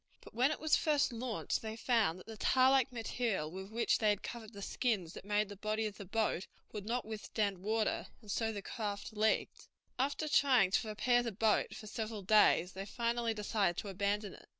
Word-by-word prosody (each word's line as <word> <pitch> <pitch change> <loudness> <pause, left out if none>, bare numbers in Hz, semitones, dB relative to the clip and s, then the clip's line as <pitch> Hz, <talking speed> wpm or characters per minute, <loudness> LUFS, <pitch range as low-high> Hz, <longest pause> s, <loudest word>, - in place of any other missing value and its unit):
But - - -14
when 250 +4 +3
it 305 - -2
was 315 -1 +3
first 295 -4 +2
launched 235 -1 -2
they 220 0 -5
found 225 -7 +2
that 185 - -13
the 225 - -8
tar 255 +4 +4
like 270 -1 +3
material 225 -8 -2
with 190 +2 -7
which 230 +2 +1
they 215 - +3
had 205 -1 0
covered 230 -2 -7
the 200 -2 -8
skins 195 -10 -1
that - - -9
made 210 +1 +1
the 205 - -8
body 215 +2 -1
of 210 -2 -4
the 200 - -8
boat 205 -2 -1 0.2
would 210 -1 -6
not 245 +2 -1
withstand 210 -2 -2
water, 215 +3 0
and 210 -3 -8
so 225 +1 0
the 205 -2 -6
craft 205 -2 -4
leaked. 215 +1 0 0.3
After 285 +4 0
trying 260 -10 +4
to 220 +3 +1
repair 245 +3 +2
the 235 -1 -3
boat 215 +1 +1
for - - -9
several 215 -1 -4
days 185 -3 +5
they 195 +1 -6
finally 235 0 -1
decided 205 -4 0
to 205 - -7
abandon 200 +1 -1
it. - - -16
215 Hz, 210 wpm, -34 LUFS, 200-235 Hz, 0.3 s, days